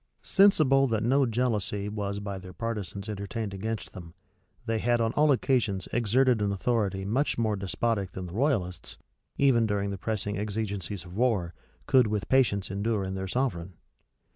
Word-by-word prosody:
Sensible 150 -9 +4
that 110 -3 0
no 135 +3 +3
jealousy 110 -4 -1
was 100 -1 -3
by 100 -1 -5
their 95 0 -11
partisans 105 -3 -4
entertained 100 0 -4
against 110 +3 -4
them, 85 -3 -10 0.5
they 115 -1 0
had 120 +2 +2
on 115 -1 +1
all 150 0 +4
occasions 120 -8 +1
exerted 120 +1 +3
an 100 -1 +1
authority 100 -2 -1
much 130 +9 0
more 110 -2 +1
despotic 100 +1 -1
than 95 - -5
the 90 - -8
royalists, 105 - -1 0.4
even 120 -5 +4
during 100 -1 -1
the 100 - -5
pressing 105 -2 -2
exigencies 100 -3 -3
of 90 - -11
war, 105 -8 +1 0.3
could 130 -3 +4
with 105 -1 -2
patience 115 -8 +2
endure 100 +1 -1
in 95 0 -4
their 95 0 -4
sovereign. 95 -6 -2
105 Hz, 165 wpm, -28 LUFS, 100-120 Hz, 0.5 s, Sensible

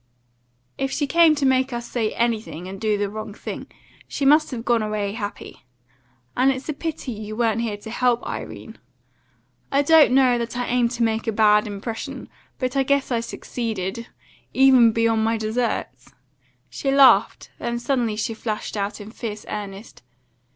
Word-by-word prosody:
"If 270 - 0
she 290 - -1
came 325 +2 +5
to 285 -2 -1
make 260 0 +2
us 240 0 -4
say 225 -3 -1
and 215 -5 -2
do 215 -2 +1
the 205 0 -1
wrong 215 0 -7
thing, - - -7 0.4
she 280 - -3
must 300 +3 +5
have 240 -3 -6
gone 235 -2 +2
away 210 -2 -2
happy; 205 - -7 0.7
and 255 +2 +3
it's 265 0 -5
a 305 - -1
pity 300 -3 -5
you 215 -1 -6
weren't 230 -1 +1
here 220 -3 -2
to 220 +2 -10
help, 245 0 +1
Irene. - - -7 0.9
I 280 +1 +3
don't 310 -3 +6
know 255 -2 +4
that 235 +1 -4
I 245 - -1
aimed 245 -1 +1
to 235 - -1
make 225 0 0
a - - +2
bad 210 0 +4
impression, 210 +3 -6 0.3
but 255 0 -3
I 275 - +3
guess 280 0 +1
I 235 - +1
succeeded 230 -2 -4 0.5
even 260 -4 +6
beyond 225 0 +1
my 225 +1 +1
deserts." 220 - -3 0.5
She 275 - -4
laughed; 270 -1 +4
then 235 0 -2
suddenly 240 -3 -1
she 225 +2 -2
flashed 220 -1 -4
out 200 +1 -3
in 210 +1 -9
fierce 215 -3 -6
earnest. 205 +1 -7
230 Hz, 170 wpm, -23 LUFS, 215-260 Hz, 0.9 s, don't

